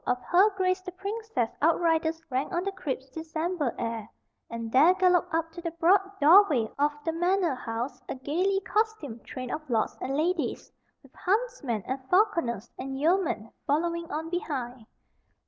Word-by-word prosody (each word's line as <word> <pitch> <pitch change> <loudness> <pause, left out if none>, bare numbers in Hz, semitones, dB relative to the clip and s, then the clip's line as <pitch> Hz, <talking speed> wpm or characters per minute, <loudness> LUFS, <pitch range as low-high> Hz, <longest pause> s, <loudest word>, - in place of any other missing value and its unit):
of 250 0 +1
Her 375 +4 +5
Grace 370 0 +1
the 365 - -7
Princess' 400 - -3
outriders 325 0 +2
rang 260 +2 -1
on 345 - -1
the 395 - -1
crisp 265 -8 -5
December 320 -3 -2
air, 230 -2 -4 0.4
and 230 -1 -5
there 310 +9 +6
galloped 365 -2 +3
up 330 0 -1
to 345 +1 -9
the 335 - -2
broad 335 +4 +4 0.2
doorway 300 - +6
of 295 +1 +3
the 325 - +1
manor 350 0 +1
house, 245 +1 -4
a - - -3
gayly 360 +9 0
costumed 385 - -2
train 255 -1 -6
of 310 - -3
lords 225 -3 0
and 270 +2 -2
ladies, 330 +1 -1 0.3
with - - -20
huntsmen 380 - -1
and 260 +1 -3
falconers 340 - +1
and 270 0 -4
yeomen 320 - +1 0.2
following 335 +3 0
on 320 +2 -4
behind. 255 -9 -4
325 Hz, 160 wpm, -28 LUFS, 260-365 Hz, 0.4 s, there